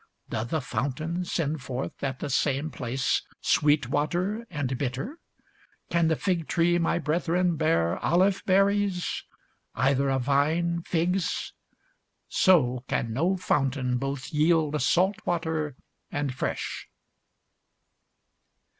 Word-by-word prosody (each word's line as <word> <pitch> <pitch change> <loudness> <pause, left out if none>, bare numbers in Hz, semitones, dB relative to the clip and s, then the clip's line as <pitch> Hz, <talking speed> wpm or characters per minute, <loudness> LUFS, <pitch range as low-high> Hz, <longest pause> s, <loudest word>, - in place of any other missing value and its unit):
Doth 115 +2 -3
a 160 - +1
fountain 155 +8 -2
send 155 -4 -1
forth 130 +1 -5
at 135 -2 -1
the 145 - -3
same 140 +3 +1
place 125 +1 -1 0.2
sweet 150 -4 +3
water 180 - -1
and 145 -6 -2
bitter? 135 - -4 0.7
Can 170 -1 +3
the 160 - +2
fig 170 -2 -1
tree, 175 +1 +2
my 170 - +1
brethren, 175 +2 +1
bear 155 - +1
olive 185 +3 +2
berries? 195 -1 +2 0.5
either 135 +1 +2
a 135 - +2
vine, 155 +6 +1
figs? 175 +2 -1 0.7
so 130 -10 +3
can 115 -1 -1
no 175 +10 +1
fountain 135 -7 0
both 135 -1 -4
yield 155 -1 +2
salt 185 +9 +3
water 160 -4 -1 0.3
and 145 -2 -2
fresh. - - -4
155 Hz, 115 wpm, -27 LUFS, 135-175 Hz, 0.7 s, sweet